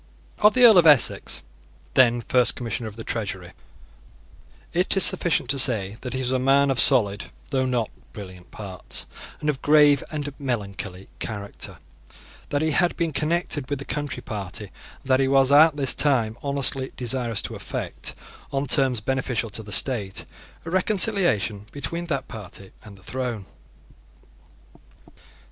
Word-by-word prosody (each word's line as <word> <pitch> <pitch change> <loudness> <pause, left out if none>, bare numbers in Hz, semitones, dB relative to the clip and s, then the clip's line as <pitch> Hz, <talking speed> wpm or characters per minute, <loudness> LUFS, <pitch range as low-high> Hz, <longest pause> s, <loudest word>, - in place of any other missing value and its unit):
Of 210 +3 +4
the 250 -1 +7
Earl 220 -6 +8
of 165 - +4
Essex, 145 -6 +3 0.5
then 120 -2 +4
First 125 +1 +2
Commissioner 120 -1 -4
of 105 - -15
the 115 - -8
Treasury, 100 -6 -4 1.2
it 180 +3 0
is 195 - +8
sufficient 165 -7 +3
to 140 - 0
say 110 -5 +3
that 125 -2 -6
he 130 - -2
was 125 -1 -1
a 130 - +1
man 135 +2 +3
of 130 - 0
solid, 105 -7 +5 0.3
though 130 -2 0
not 120 -3 -1 0.2
brilliant 95 -3 -11
parts, 95 -4 -7 0.3
and 150 - -5
of 145 -3 -1
grave 145 -2 +4
and 145 -2 -5
melancholy 100 -7 -5
character, 100 -3 -6 0.7
that 145 +1 -1
he 160 - +1
had 175 +3 +1
been 165 -3 -1
connected 155 -3 -1
with 145 - -2
the 140 - -8
Country 145 -1 -4
Party, 105 -1 -6 0.4
and - - -29
that 130 0 +2
he 135 - +2
was 135 0 +3
at 150 +1 +6
this 135 -2 +2
time 120 -7 +2
honestly 140 -1 0
desirous 120 -3 -1
to - - -6
effect, - - -5 0.4
on 140 +1 -1
terms 130 -5 +1
beneficial 125 -2 -2
to 110 - -4
the 105 -1 -12
state, 105 -5 0 0.4
a 165 - -6
reconciliation 180 - +1
between 170 +5 -5
that 140 -5 -3
party 100 -3 -10
and 100 -2 -13
the 95 - -20
throne. 125 -5 -4
130 Hz, 160 wpm, -23 LUFS, 110-145 Hz, 1.2 s, Earl